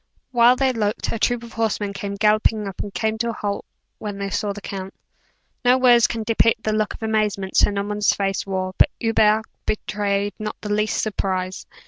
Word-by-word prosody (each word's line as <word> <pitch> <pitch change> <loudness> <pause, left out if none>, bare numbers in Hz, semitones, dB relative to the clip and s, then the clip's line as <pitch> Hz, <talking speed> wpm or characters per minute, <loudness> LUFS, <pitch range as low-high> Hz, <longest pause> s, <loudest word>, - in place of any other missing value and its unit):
While 240 0 +6
they 265 0 +1
looked, 210 -3 -1
a 230 - -3
troop 245 0 +1
of 235 - -11
horsemen 215 -2 -1
came 200 0 -5
galloping 215 0 +2
up, 195 - -8
and 205 - -4
came 220 +2 -1
to 235 +1 0
a - - -2
halt 205 -2 -3 0.3
when 205 -2 -5
they 200 0 -4
saw 205 +1 -1
the 205 - -6
count. 195 -1 -7 0.7
No 250 +1 +5
words 245 -2 +6
can 230 -2 -3
depict 225 0 +2
the 215 - 0
look 215 0 0
of - - -11
amazement 210 -3 -1
Sir - - +5
Norman's 205 +1 0
face 195 -1 -1
wore; 185 -1 -3
but - - +6
Hubert 220 -1 +3 0.2
betrayed 205 -1 -1
not 215 0 -5
the 210 -1 -2
least 210 +1 0
surprise. 185 -3 -2
210 Hz, 195 wpm, -22 LUFS, 200-225 Hz, 0.7 s, While